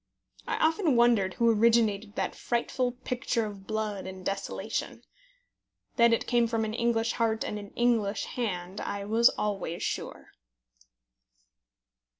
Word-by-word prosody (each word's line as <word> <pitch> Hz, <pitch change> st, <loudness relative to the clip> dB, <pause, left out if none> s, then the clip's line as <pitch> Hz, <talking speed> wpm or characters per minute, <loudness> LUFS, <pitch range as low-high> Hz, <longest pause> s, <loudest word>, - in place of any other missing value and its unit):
I 475 Hz, -, 0 dB
often 320 Hz, -, +2 dB
wondered 235 Hz, -6 st, +3 dB
who 235 Hz, -1 st, +4 dB
originated 220 Hz, -2 st, +2 dB
that -, -, -1 dB
frightful 245 Hz, +1 st, -1 dB
picture 245 Hz, -2 st, -1 dB
of 200 Hz, -2 st, -9 dB
blood 215 Hz, -3 st, -3 dB
and 190 Hz, -1 st, -9 dB
desolation. 195 Hz, 0 st, -3 dB, 0.9 s
That 235 Hz, 0 st, +6 dB
it 230 Hz, -, +1 dB
came 240 Hz, -1 st, +2 dB
from 225 Hz, -1 st, 0 dB
an 215 Hz, -, -4 dB
English 230 Hz, -1 st, +1 dB
heart 225 Hz, -2 st, 0 dB
and 210 Hz, -, -4 dB
an 205 Hz, -1 st, -9 dB
English 225 Hz, -4 st, +1 dB
hand 190 Hz, -5 st, -4 dB
I 200 Hz, 0 st, -4 dB
was 225 Hz, +3 st, +5 dB
always 195 Hz, -5 st, -3 dB
sure. -, -, -4 dB
225 Hz, 135 wpm, -28 LUFS, 200-235 Hz, 0.9 s, That